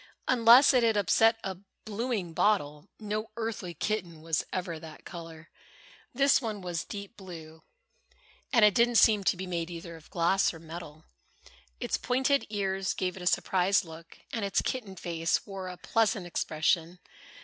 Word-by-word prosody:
Unless 240 +4 +7
it 250 - +4
had 225 -2 +2
upset 225 +3 +4
a 190 -2 -4 0.3
blueing 215 -5 -3
bottle, 160 -4 0
no 215 0 -3
earthly 220 -6 -4
kitten 175 -4 -3
was 165 -1 0
ever 175 -3 -3
that 160 -1 -12
color. 165 -2 -10 0.6
This 275 +2 +3
one 215 -4 -4
was 175 -3 -3
deep 200 +2 -8
blue, 160 -4 -11 0.9
and 230 -5 +6
it 210 - +5
didn't 235 +2 +3
seem 210 -1 +5
to 185 - +2
be 190 - -4
made 170 -2 -3
either 170 0 -8
of 160 0 -15
glass 175 +1 +2
or - - -10
metal. 160 -1 -10 0.7
Its - - -1
pointed 265 +3 +1
ears 195 -2 -1
gave 180 -1 -2
it 190 - -9
a 180 - -3
surprised 185 +1 +2
look 165 0 -12 0.2
and 225 - -2
its 200 -1 +1
kitten 215 -7 -4
face 165 -2 -1
wore 195 -2 -6
a 180 -1 -7
pleasant 215 -1 0
expression. 165 +1 0
190 Hz, 160 wpm, -29 LUFS, 170-215 Hz, 0.9 s, Unless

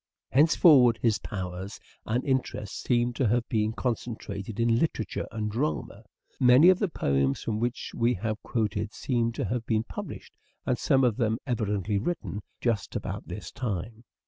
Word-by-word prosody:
Hence 150 +4 +5
forward 125 -8 +6
his 115 -3 +3
powers 95 0 -6 0.3
and 120 +3 0
interests 125 -7 -2
seem 120 -1 +1
to 125 0 +1
have 120 +2 +1
been 110 -1 +1
concentrated 110 -3 -4
in 115 0 +3
literature 115 -9 -2
and 105 -2 -3
drama. 115 -4 -3 0.3
Many 130 +6 +7
of 185 0 +4
the 205 - +1
poems 70 - 0
from 110 -2 -2
which 120 +1 -2
we 120 +1 +2
have 110 +2 -3
quoted 105 -2 -2
seem 120 -3 0
to - - -2
have 115 +4 -2
been 110 -1 +1
published, - - -8 0.3
and - - 0
some 135 -1 +3
of 120 -4 +2
them 115 -3 +1
evidently 105 -5 -1
written, 110 - -3 0.2
just 115 -5 -1
about - - -4
this - - -7
time. 110 -1 -4
115 Hz, 165 wpm, -27 LUFS, 105-125 Hz, 0.3 s, Many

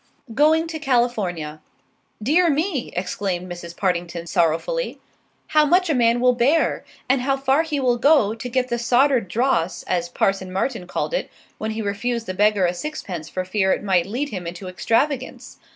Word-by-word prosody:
GOING 310 +5 +4
TO 325 -1 -6
CALIFORNIA 210 - -1 0.6
"Dear 335 +8 +3
me!" 310 -2 -1
exclaimed 180 0 -2
Mrs. 175 -1 -8
Partington 175 -2 -2
sorrowfully, 175 - 0 0.5
"how 305 -1 +5
much 355 +3 +3
a - - +3
man 235 -2 +3
will 250 0 +4
bear, 275 +7 +2 0.2
and 260 0 +2
how 270 +1 +1
far 270 +2 +2
he 315 -3 -2
will 250 -2 +2
go, 275 -7 +4
to 230 +2 -6
get 255 +1 0
the 240 - -1
soddered 245 -1 +3
dross, 185 -5 0
as 175 -1 -1
Parson 190 0 0
Martin 195 0 -2
called - - -3
it - - -1 0.3
when 220 - -3
he 220 0 -3
refused 230 +3 -2
the 185 - -4
beggar 205 0 +3
a 175 - +1
sixpence 180 - -6
for 185 0 -3
fear 190 0 +1
it - - -3
might 185 -3 +2
lead 260 +8 -2
him 185 -7 -5
into 175 +2 -7
extravagance! 250 +9 -1
230 Hz, 175 wpm, -22 LUFS, 185-275 Hz, 0.6 s, how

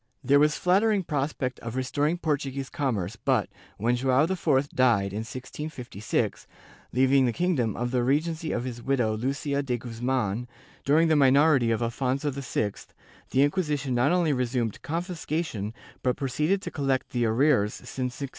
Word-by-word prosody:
There 140 +1 +5
was 150 +1 +4
flattering 200 +2 +3
prospect 140 -4 -2
of 115 +1 -6
restoring 145 +5 0
Por 160 -3 +1
tuguese 135 -1 -5
commerce 115 - -2
but, - - +1 0.3
when 120 +4 +1
Joao 130 +3 +3
IV 155 -6 +1
died, 105 -7 +2
in 105 - -2
1656, 125 -1 -4 0.4
leaving 130 +1 +4
the - - +1
kingdom 135 - 0
under 120 +1 -2
the 125 -2 +1
regency 155 +4 0
of - - -1
his 120 -2 -6
widow 120 -4 +1
Lucia 140 +4 -1
de 125 -3 -1
Guzman, 120 -1 -2 0.4
during 155 +4 +4
the 160 - +3
minority 140 -2 +5
of 115 0 0
Affonso 130 +4 -1
VI, 125 -6 -2 0.6
the 135 - +3
Inquisition 145 -4 0
not 120 +5 +3
only 175 -4 +2
resumed 125 -4 -1
confiscation 160 - -3 0.3
but 125 -1 0
proceeded 150 +8 0
to - - -5
collect 135 -3 -1
the 120 -1 +1
arrears 115 -2 +2
since 125 -2 -5
1649. 140 -2 -4
135 Hz, 155 wpm, -27 LUFS, 120-150 Hz, 0.6 s, There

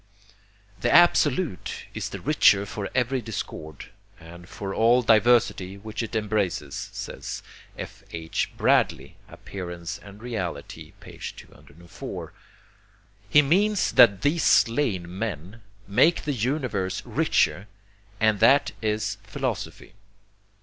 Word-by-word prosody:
] 100 -1 -30
'The - - +1
Absolute 160 - +3
is - - -4
the - - -7
richer 100 +1 +4
for 100 0 -5
every 130 +1 +1
discord, 80 -8 -7 0.3
and 85 +1 -13
for 100 -1 -6
all 120 +4 +4
diversity 110 -4 +3
which 110 +2 -6
it 115 0 -5
embraces,' 105 -4 -2
says - - -6 0.3
F. - - -8
H. 80 -1 -3
Bradley - - +1
(Appearance 85 -3 -7
and 100 0 -13
Reality, 95 -12 -6
204). 85 +4 -10 1.0
He 150 +6 +6
means 195 +7 +2
that 105 -5 +6
these 160 +3 +2
slain 115 -10 +2
men 105 0 -5 0.3
make 155 - +3
the 150 - -1
universe 120 -6 -2
richer, 100 +4 +1 0.5
and 110 -2 +2
that 135 +6 +5
is 105 -2 -1
Philosophy. 100 -4 -5
105 Hz, 110 wpm, -25 LUFS, 95-125 Hz, 1.0 s, He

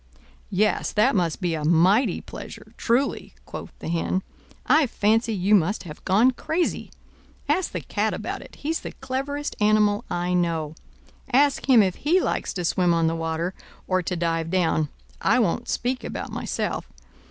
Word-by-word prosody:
"Yes, 210 +3 +1
that 220 +5 +3
must 175 -1 0
be 175 -2 0
a 155 -2 -3
mighty 175 - +3
pleasure, - - -10
truly," 250 +4 0
quoth - - -7
the - - -8
Hen. 170 +3 -1 0.4
"I 305 -2 +4
fancy 225 +1 +1
you 195 +2 +1
must 200 +1 +3
have 155 -4 -10
gone 215 +7 +4
crazy. 325 +7 -2 0.6
Ask 375 - +1
the - - -4
Cat - - -1
about - - -4
it—he's 320 +3 -4
the - - -7
cleverest 275 +2 -4
animal 210 -1 +3
I 175 +1 -1
know—ask 175 - -1
him 240 -5 +7
if 185 -2 -1
he 335 +6 +3
likes - - -1
to 180 -2 -3
swim 175 0 +2
on 165 -1 +2
the 165 0 +1
water, 165 +2 -2 0.3
or 185 0 +2
to 180 +1 -3
dive 165 -1 -1
down: 165 -4 +1 0.3
I - - +3
won't 235 +1 0
speak 250 +1 -1
about - - -5
myself. - - -3
195 Hz, 160 wpm, -24 LUFS, 170-250 Hz, 0.6 s, him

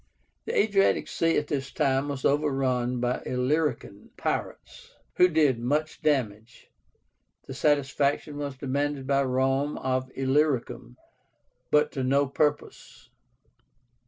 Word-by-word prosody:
The - - -2
Adriatic 200 -2 +2
Sea 165 0 +1
at 150 - 0
this 140 -2 -3
time 135 -2 0
was 140 -2 -4
overrun 135 -4 0
by 125 +1 -1
Illyrican 125 -5 -2
pirates, - - -5 0.2
who 180 - +7
did 150 -8 +2
much 150 +6 -2
damage. 120 -7 -2 0.8
Satisfaction 145 0 0
was 140 -2 -5
demanded 140 +1 -2
by 140 0 +2
Rome 135 +2 0
of 130 0 -2
Illyricum, 130 -3 -1 0.7
but 150 0 +3
to 135 - -3
no 140 +2 +2
purpose. 145 +2 -3
140 Hz, 110 wpm, -26 LUFS, 130-150 Hz, 0.8 s, who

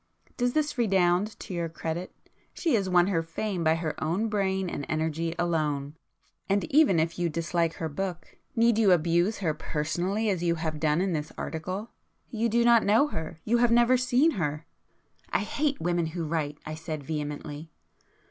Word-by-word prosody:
Does 245 0 0
this 300 -4 0
redound 195 -1 +2
to - - -7
your 170 -1 -2
credit? 165 +2 -4 0.4
She 330 - 0
has 200 -5 +1
won 175 -1 +5
her 180 -4 +1
fame 175 +3 -3
by 160 0 +4
her 165 -2 -3
own 185 +8 0
brain 190 -2 0
and 145 - -4
energy 160 +1 -1
alone,—and 160 +4 -2
even 285 - +5
if 165 +2 -1
you 175 -1 +1
dislike 165 +1 0
her 160 - -4
book 180 +3 -5 0.2
need 230 -1 +4
you 200 -5 +6
abuse 175 +5 +2
her 155 - +2
personally 175 +8 -2
as 190 -5 0
you 170 -1 +1
have 160 -2 -3
done 155 +2 +2
in 190 -1 0
this 150 -1 -3
article? 185 +7 -4 0.4
You 230 0 0
do 235 +2 +3
not 235 -2 +6
know 225 +9 +4
her; 160 - -6
you 235 +2 +3
have 240 0 +4
never 240 +2 +5
seen 255 +5 +3
her, 150 +1 -2 0.3
..." - - -42 0.3
"I - - +1
hate 290 -1 -1
women 175 0 0
who 165 +1 -4
write!" 150 -2 -2
I 155 - -5
said 155 -2 -5
vehemently. 150 +1 -5
175 Hz, 180 wpm, -27 LUFS, 160-210 Hz, 0.4 s, you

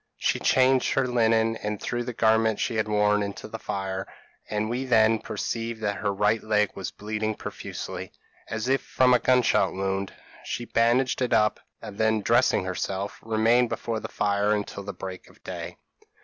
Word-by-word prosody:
She - - 0
changed 130 0 +3
her 135 - +2
linen, 115 -2 +2
and 105 -1 -4
threw 120 0 -2
the 125 - -4
garments 110 -1 +2
she 115 - -1
had 110 - 0
worn 105 0 +2
into 100 -1 -5
the 110 +1 -7
fire; 95 -2 -4 0.4
and 105 0 -1
we 120 +3 -2
then 110 -3 +4
perceived 115 0 -4
that 100 -1 -1
her 105 - -1
right 105 +3 +1
leg 105 -2 +1
was 95 - -5
bleeding 110 +1 -3
profusely, - - -6 0.4
as 110 +2 -3
if 135 +1 +2
from 130 -1 +3
a 125 - +5
gun 125 +1 +3
shot - - +2
wound. 95 0 -2 0.3
She 120 - -4
bandaged 120 +3 +2
it 125 - +1
up, 105 0 +3 0.2
and 105 -2 -9
then 110 -1 +2
dressing 120 -3 +3
herself, 95 +2 -3
remained 115 +2 +3
before 115 0 -3
the - - -6
fire 105 +1 +1
until 105 -1 -4
the 100 0 -5
break 95 -2 -8
of - - -22
day. - - -6
110 Hz, 180 wpm, -26 LUFS, 105-115 Hz, 0.4 s, a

